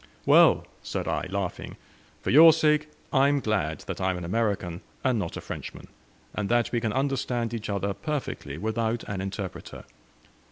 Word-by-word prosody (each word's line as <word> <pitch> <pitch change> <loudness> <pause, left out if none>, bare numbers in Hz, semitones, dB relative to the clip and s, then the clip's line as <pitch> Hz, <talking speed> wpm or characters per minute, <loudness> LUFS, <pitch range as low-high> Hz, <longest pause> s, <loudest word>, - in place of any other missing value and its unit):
"Well," - - +6 0.2
said - - -4
I, - - -1
laughing, 95 -2 -4 0.5
"for - - 0
your 160 +4 +9
sake 150 -1 +2 0.2
I 135 0 +5
am 145 0 +2
glad 100 - -1
that - - -6
I 95 - +2
am 95 - -1
an 90 - -5
American, 95 -3 -1 0.2
and 130 -4 +2
not 85 -4 -4
a - - -6
Frenchman, - - -8 0.4
and 105 -2 -2
that 120 0 +2
we 120 - 0
can 110 -2 0
understand 125 -3 -1
each 115 -3 -4
other 100 0 -1
perfectly 135 - -4
without 110 +4 -1
an 100 -2 -4
interpreter. 95 -1 -6
110 Hz, 170 wpm, -27 LUFS, 95-130 Hz, 0.5 s, your